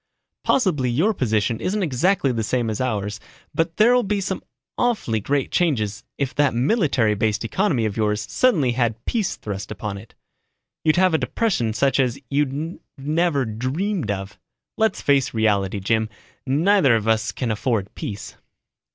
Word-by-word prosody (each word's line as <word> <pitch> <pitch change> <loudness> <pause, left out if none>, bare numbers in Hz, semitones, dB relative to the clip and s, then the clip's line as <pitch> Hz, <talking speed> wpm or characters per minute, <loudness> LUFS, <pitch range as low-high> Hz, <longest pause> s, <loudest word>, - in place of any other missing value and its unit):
"Possibly 160 - +2
your 165 - +2
position 110 - 0
isn't 200 +2 0
exactly 170 +1 +2
the 115 -2 -1
same 115 0 0
as 110 - -3
ours 105 -4 -2 0.3
but 165 0 -1
there'll 245 +3 +5
be 205 -2 -1
some 190 0 -3 0.3
awfully 210 - 0
great 140 +5 -1
changes 110 - 0
if 135 -2 -2
that 145 -4 +2
military 130 - +2
based 105 +1 0
economy 145 - +1
of 105 -2 -2
yours 105 -1 0
suddenly 160 - +2
had 115 -2 -1
peace 220 -5 -1
thrust 100 -1 -6
upon 100 -2 -5
it. 110 - -16 0.7
You'd 155 -1 +3
have 185 -1 +4
a 160 - +3
depression 180 - 0
such 135 +5 +2
as 125 -3 +1
you've 145 +4 -1 0.2
never 150 0 +1
dreamed 130 - -2
of. 95 -1 -4 0.4
Let's 220 0 0
face 140 -4 +2
reality, 100 -3 +1
Jim, 110 +3 0 0.4
neither 150 - +4
of 110 -1 -1
us 110 0 +2
can 125 -4 -2
afford 110 -2 -1
peace." 100 -1 -6
130 Hz, 155 wpm, -22 LUFS, 110-170 Hz, 0.7 s, there'll